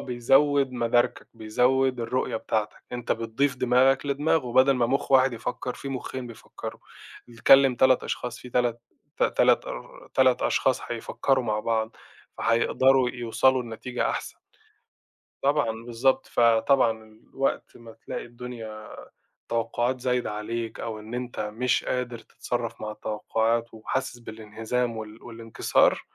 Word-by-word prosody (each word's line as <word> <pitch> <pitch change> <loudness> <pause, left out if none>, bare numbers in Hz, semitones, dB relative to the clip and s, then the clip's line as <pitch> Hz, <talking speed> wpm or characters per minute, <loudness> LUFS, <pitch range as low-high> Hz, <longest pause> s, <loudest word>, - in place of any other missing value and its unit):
بيزوّد 135 +3 +2
مداركك، 120 0 0
بيزوّد 125 +3 +1
الرؤية 120 0 -1
بتاعتك، 110 -1 -3
أنت 120 -1 -1
بتضيف 125 +5 -1
دماغك 130 +2 +3
لدماغه 140 -2 0
بدل 130 +2 +5
ما 120 -2 +2
مُخ 135 +3 -1
واحد 130 -1 +5
يفكّر 125 +2 -4
في 140 - -7
مُخّين 130 -1 -5
بيفكّروا 115 -2 -9 0.5
بيكلّم 135 +3 +5
3 130 +1 +4
أشخاص، 125 0 -4
في 125 - -11
3 120 -1 0 0.4
ت - - -2
تَلَت - - +3
آآ، - - -9
3 130 -1 +4
أشخاص 130 -2 +1
هيفكّروا 125 +2 -1
مع 105 -1 0
بعض، 110 -1 -1 0.4
فهيقدروا 130 +2 +3
يوصلوا 125 +2 +1
لنتيجة 120 +2 -3
أحسن. - - -5 1.0
طبعًا 140 -4 +2
بالضبط، 120 +3 +1
فطبعا 115 -2 +2
وقت 135 0 -2
ما 115 -1 -13
تلاقي - - -7
الدنيا 115 -3 -8 0.6
التوقّعات 120 +2 -1
زايدة 125 -3 0
عليك 110 +2 -4
أو 110 -2 -5
إن 110 +2 -10
أنت 125 0 -5
مش 115 +4 0
قادر 125 -2 -2
تتصرّف 120 0 -5
مع 105 0 -4
التوقّعات 115 +2 -1
وحاسس 120 +3 -3
بالإنهزام 115 +2 -3
وال 110 0 -9
والإنكسار، 115 -1 +1
120 Hz, 130 wpm, -26 LUFS, 115-130 Hz, 1.0 s, بدل